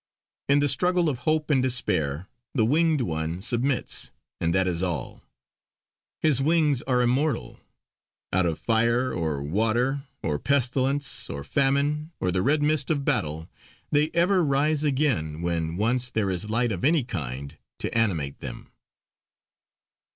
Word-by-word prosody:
In 140 +1 +5
the 145 - +3
struggle 180 +2 +2
of 130 -5 -3
hope 155 -1 +1
and 135 -3 +4
despair 90 - 0 0.3
the 115 -5 +3
Winged 155 +3 +2
One 80 -3 -2
submits, 125 +5 0 0.3
and 85 - +1
that 95 0 +3
is 90 -2 -1
all. 90 -4 -3 1.0
His 145 -4 +2
wings 150 -3 +2
are 125 -2 +3
immortal; 130 - 0 0.7
out 90 -1 +3
of 80 -2 -1
fire 120 +3 +1
or 80 -4 -2
water, 115 - 0 0.2
or 75 -2 -1
pestilence, 140 +1 0
or 70 0 -5
famine, 140 - 0
or 90 - 0
the 90 +1 0
red 145 +6 +2
mist 150 -2 +1
of 145 -4 0
battle 80 - -1 0.4
they 150 +1 +3
ever 180 +2 +3
rise 145 +1 +1
again, 130 - 0
when 85 -1 -1
once 120 +4 0
there 110 -5 0
is 95 +3 -3
light 115 +2 +1
of 95 - -4
any 155 0 +3
kind 70 - -6 0.2
to - - -4
animate 85 -12 0
them. - - -8
125 Hz, 145 wpm, -25 LUFS, 85-145 Hz, 1.0 s, In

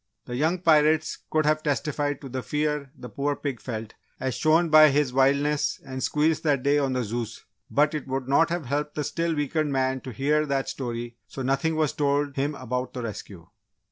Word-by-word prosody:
The 120 - -5
young 160 +7 +1
pirates 155 -2 +3
could 155 -1 +1
have 155 0 +2
testified 145 -1 -1
to 135 - -8
the 130 +1 -3
fear 150 0 -1
the 125 - -8
poor 140 +3 -2
pig 140 -5 -4
felt 110 -3 -6 0.3
as 130 -1 -2
shown 160 +5 +3
by 155 0 +8
his 140 -2 +1
wildness 140 +3 +2
and 130 0 -6
squeals 155 +3 +1
that 145 -5 +1
day 145 +1 +3
on 135 -2 0
the 125 -1 0
Zeus, 115 +1 -5 0.2
but 150 +2 +2
it 150 -3 -4
would 130 -1 -3
not 140 +5 +4
have 170 -3 -2
helped 145 +3 -2
the 150 - -1
still 165 +2 -1
weakened 150 +1 -1
man 130 -1 0
to 130 - -8
hear 150 +6 +1
that 135 -1 -1
story 120 -2 -5
so 135 - -6
nothing 140 +5 +1
was 155 -3 +1
told 145 -1 0
him 145 +2 -1
about 125 0 -4
the 125 - -5
rescue. 100 -5 -7
140 Hz, 205 wpm, -26 LUFS, 130-150 Hz, 0.3 s, by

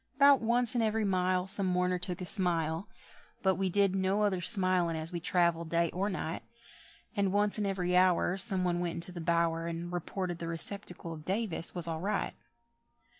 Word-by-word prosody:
'Bout 280 -1 +5
once 240 +2 +2
in 240 - 0
every 220 -1 0
mile 185 -1 0
Some 190 0 +3
mourner 180 0 0
took 180 0 -5
a - - -4
smile, 175 -1 +1 0.5
But 190 -1 +3
we 190 0 -2
did 195 0 +1
no 195 +2 0
other 190 -3 0
smilin' 185 -4 +1
as 160 +1 +1
we 170 - -3
travelled 170 -1 0
day 170 0 0
or 195 +3 -2
night; 170 -4 -5 0.7
And 200 -2 0
once 205 +1 +1
in 205 - -1
every 180 -2 -2
hour 180 0 +2
Some 195 -2 +4
one 175 -1 -1
went 175 -1 -3
into 170 +2 -7
the 175 -1 -8
bower, 165 0 0
And 170 +1 -6
reported 175 0 -4
the 165 - -5
receptacle 170 0 -2
of 155 -2 -11
Davis 190 -2 +2
was 175 -2 +4
all 160 -1 -4
right. 200 +2 -2
180 Hz, 190 wpm, -30 LUFS, 170-200 Hz, 0.7 s, Bout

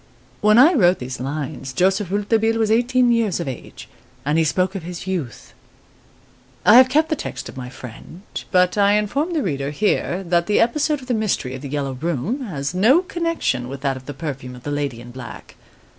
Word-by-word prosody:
* 125 0 -32
When 215 +1 +5
I 290 +9 +7
wrote 185 - +4
these 130 +1 -6
lines, 135 -1 -5
Joseph 190 +4 +1
Rouletabille 220 +3 +1
was 220 -1 +1
eighteen 245 +2 +3
years 225 -7 +1
of 170 - -4
age, 130 - -8 0.4
and 150 +3 +2
he - - +4
spoke 185 +5 0
of 195 - -4
his 175 +1 -7
"youth." 170 - -5 1.1
I 215 - +8
have 255 0 +7
kept 310 +4 +2
the 315 - +1
text - - -6
of - - -10
my 125 -1 -7
friend, 130 - -11 0.3
but 180 +1 +2
I 200 0 +5
inform 275 - 0
the 310 -4 0
reader 140 -5 -2
here 190 +2 0
that 170 -1 +1
the 210 - +2
episode 295 +4 +1
of 255 - -12
the 250 - 0
mystery 210 - -1
of 130 - -7
"The 140 - -7
Yellow 140 -1 -2
Room" 165 - -2
has 145 -6 -4
no 240 - +4
connection 335 - -2
with 135 0 -7
that 135 -1 0
of 130 0 -11
the 145 - -6
perfume 135 -4 -6
of 125 - -13
the 145 - -4
lady 140 -5 -3
in 120 0 -11
black. 130 0 -10
180 Hz, 210 wpm, -21 LUFS, 140-225 Hz, 1.1 s, I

